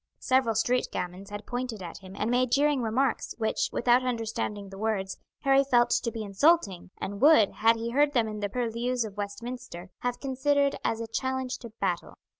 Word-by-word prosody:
Several 255 -4 +2
street 245 +3 +1
gamins 180 +3 -5
had 205 0 -7
pointed 245 -5 -4
at 170 - -8
him 190 0 -12
and 220 +3 -1
made 250 0 +2
jeering 285 -1 +3
remarks, 240 +3 0
which, 220 -1 0
without 245 +1 +3
understanding 225 -4 -3
the 195 - -10
words, 200 -3 -1 0.3
Harry 275 0 +4
felt 240 -3 +3
to 230 - +1
be 225 -1 -5
insulting, 200 - +2
and 200 +2 -5
would, 280 -8 +6
had 225 +1 +3
he 230 +1 -4
heard 290 +3 +3
them 235 -4 +2
in 215 -1 -5
the 205 -1 -2
purlieus 240 +2 -1
of 205 -2 -8
Westminster, 205 -2 -6
have 245 0 -2
considered 280 +1 +1
as 225 0 -1
a 230 - -4
challenge 260 +2 -2
to 235 - -9
battle. 180 -3 -2
235 Hz, 190 wpm, -28 LUFS, 205-255 Hz, 0.3 s, would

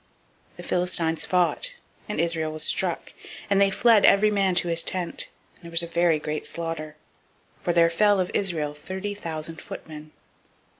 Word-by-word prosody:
004:010 - - -31
The - - -10
Philistines 170 -3 +1
fought, 185 - +1 0.3
and 210 - -3
Israel 165 -2 0
was 155 0 -3
struck, - - 0 0.4
and 200 0 +4
they 200 - +5
fled 220 +1 +4
every 210 +2 +5
man 195 -3 +1
to 180 0 +1
his 165 -1 +1
tent: 180 -1 -2 0.3
and - - -22
there - - -8
was 165 0 +1
a - - -2
very 170 -1 +2
great 150 0 -4
slaughter; 165 -2 -4 0.7
for 175 - 0
there 170 -1 +4
fell 205 +3 +3
of 180 - -1
Israel 160 -7 -1
thirty 190 +7 -5
thousand 165 -4 -5
footmen. 155 -1 -9
170 Hz, 170 wpm, -25 LUFS, 160-195 Hz, 0.7 s, they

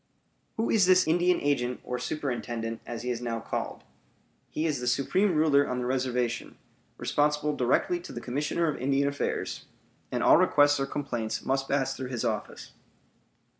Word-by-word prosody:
Who 225 +1 0
is 205 -5 +4
this 185 -1 +5
Indian 175 +2 +3
agent, 125 -4 0
or 125 0 -4
superintendent, 120 -5 -3
as 120 -1 -5
he 125 - -1
is 120 -1 -3
now 115 -1 -2
called? - - -4 0.7
He 155 - -2
is 150 -5 0
the 125 - -4
supreme 180 +9 +2
ruler 145 -2 +4
on 125 - -2
the 125 - -2
reservation, 125 -2 -1 0.4
responsible 150 0 +1
directly 135 - +1
to 360 - -10
the - - -5
Commissioner 145 +6 -1
of 150 - -2
Indian 140 +1 +2
Affairs; 140 0 -3 0.5
and - - -1
all - - +7
requests 145 0 +4
or 135 - -1
complaints 120 -6 -3
must 135 0 0
pass 135 -1 +1
through 130 -1 -5
his 125 -2 -3
office. 110 -2 -4
135 Hz, 170 wpm, -28 LUFS, 125-150 Hz, 0.7 s, all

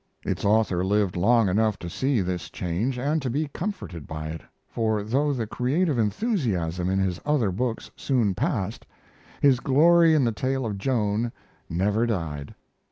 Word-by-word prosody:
Its - - -2
author 100 -4 +2
lived 100 -1 +1
long 110 +4 +4
enough 105 +2 +2
to 85 - -7
see 130 +6 0
this 90 -1 -3
change 95 +10 -2
and 145 +5 0
to 130 - -2
be 150 +6 -1
comforted 160 - -5
by 75 -1 -5
it, 80 -1 -6 0.3
for 110 -2 -1
though 135 +7 +1
the 120 -5 -2
creative 135 - 0
enthusiasm 100 - 0
in 95 - +1
his 95 -3 -1
other 145 -9 +1
books 115 +4 -3
soon 120 -8 +1
passed, 110 - -2 0.5
his 135 -3 +5
glory 165 +5 +5
in 145 - +3
the 115 - +2
tale 130 +3 -1
of 105 -3 -3
Joan 115 -1 0 0.4
never 105 +7 +1
died. 75 -9 -3
110 Hz, 165 wpm, -25 LUFS, 95-135 Hz, 0.5 s, his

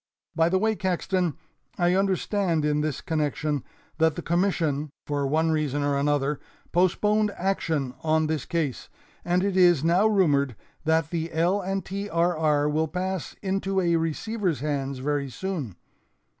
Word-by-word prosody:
By 165 +1 +3
the 190 - +2
way, 220 +3 +1
Caxton, 185 -3 -1 0.4
I 175 0 +3
understand 190 -3 +1
in 150 0 +1
this 150 -3 -2
connection 150 -2 -1 0.4
that 160 -1 +3
the - - -5
Commission, 165 -4 0 0.2
for 145 -1 -1
one 160 +3 +2
reason 145 -2 0
or 145 0 +1
another, 145 0 +1 0.3
postponed 210 +4 +2
action 160 -8 -1
on 160 0 +2
this 155 -3 -2
case, 155 -7 -2 0.3
and 180 +1 +1
it 200 -1 0
is 175 -5 +5
now 175 +6 +4
rumored 145 - +2 0.3
that 160 -1 +2
the 165 -1 -2
L. 175 +5 +1
and 195 0 -2
T. 200 +2 -4
R. 170 0 +2
R. 150 -2 +2
will 155 +2 +1
pass 185 +2 -3
into 195 0 0
a 170 -2 +2
receiver's 170 - -1
hands 140 -2 -2
very 140 +1 -1
soon. 150 - -4
165 Hz, 155 wpm, -26 LUFS, 150-185 Hz, 0.4 s, is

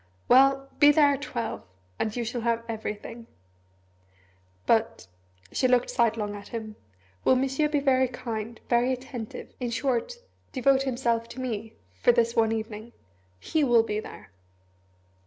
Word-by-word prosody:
"Well 270 +1 +5
be 290 0 +8
there 290 -1 +5
at 275 - -4
twelve, 235 -5 -4 0.4
and 215 -1 -1
you 240 - -1
shall 240 +1 -3
have 230 0 0
everything. 225 +1 -6 1.4
But," 225 0 +1 0.5
she 255 - +2
looked 250 -1 +2
sidelong 225 -3 0
at 200 0 -10
him, 220 -2 -6 0.5
"will - - +5
Monsieur 270 +4 +1
be 295 -1 +1
very 260 -2 +3
kind 230 -2 -6
very 245 +1 +2
attentive 250 -3 -6
in 245 -2 -2
short, 250 - -1 0.4
devote 270 0 +3
himself 240 -3 -1
to 260 - -9
me 225 -4 -4 0.2
for 95 - +3
this 235 -1 +1
one 225 -1 +3
evening? 220 +1 -5 0.5
He 310 - 0
will 240 -4 +5
be 210 -2 -2
there." 215 - -11
235 Hz, 145 wpm, -27 LUFS, 225-260 Hz, 1.4 s, be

